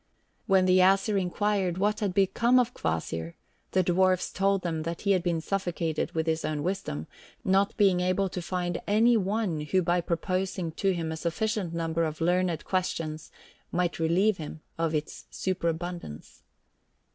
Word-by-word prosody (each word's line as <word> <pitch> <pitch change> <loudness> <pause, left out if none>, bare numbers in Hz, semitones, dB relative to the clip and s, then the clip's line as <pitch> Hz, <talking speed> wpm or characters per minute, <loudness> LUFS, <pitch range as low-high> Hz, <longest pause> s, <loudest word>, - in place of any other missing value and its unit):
When 190 -2 +4
the 185 0 +5
Æsir 195 +2 +4
inquired 190 -1 0
what 210 +2 +1
had 200 -4 -1
become 215 +6 +3
of 250 -1 +2
Kvasir, 80 +1 -3 0.3
the 185 - +2
dwarfs 185 +1 +2
told 195 0 +1
them 165 -3 -2
that 165 +1 -4
he 200 - +1
had 185 -2 +3
been 170 -2 -1
suffocated 170 -4 -2
with 160 -1 0
his 160 0 0
own 150 -2 -2
wisdom, 175 - -3 0.4
not 195 +1 +2
being 195 -4 +4
able 185 +2 +1
to 180 -1 -5
find 175 0 -2
any 225 +4 +4
one 200 -4 0
who 180 +5 +1
by 175 +1 +2
proposing 185 0 -2
to 195 +4 0
him 165 -2 -3
a 160 - -4
sufficient 180 +2 -2
number 165 0 0
of 155 -1 -3
learned 175 -1 +1
questions 165 -4 -2 0.4
might 175 -1 0
relieve 185 +6 +2
him 155 0 -7
of 165 -1 -1
its 150 0 -4
superabundance. 175 - -4
180 Hz, 160 wpm, -28 LUFS, 165-195 Hz, 0.4 s, the